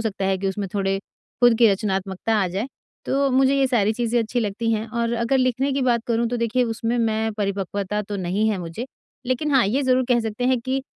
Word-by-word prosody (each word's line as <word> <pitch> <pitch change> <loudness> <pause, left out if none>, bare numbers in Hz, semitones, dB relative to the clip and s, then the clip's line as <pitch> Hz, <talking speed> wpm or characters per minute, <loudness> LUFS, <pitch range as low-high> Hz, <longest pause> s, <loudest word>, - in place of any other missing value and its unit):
सकता 205 -3 -2
है 190 0 +1
कि 195 +1 -1
उसमें 195 0 -3
थोड़े 195 -1 0 0.4
खुद 240 -1 +7
की 230 -2 +7
रचनात्मकता 195 +1 -1
आ - - +1
जाए। 195 +7 -3 0.4
तो 275 +1 +1
मुझे 265 +1 +3
ये 270 -1 +3
सारी 220 -4 +2
चीज़ें 240 +1 0
अच्छी 230 +2 -1
लगती 220 +1 -1
हैं 220 +1 -1
और 235 -1 -1
अगर 235 +3 +1
लिखने 255 +2 +1
की 275 - 0
बात 240 -2 +2
करूँ, 235 0 +1
तो 245 - -2
देखिए 235 +2 +1
उसमें 230 +1 -2
मैं 220 -1 0
परिपक्वता 200 0 -2
तो 205 0 -5
नहीं 195 +4 0
है 210 - 0
मुझे। 175 +8 -6 0.4
लेकिन 260 +4 0
हाँ, 265 -3 +5
ये 260 +7 +1
ज़रूर 255 -1 +2
कह 245 -2 +3
सकते 225 +2 -3
हैं 255 -1 +3
कि 260 +2 -2
225 Hz, 225 wpm, -23 LUFS, 200-250 Hz, 0.4 s, खुद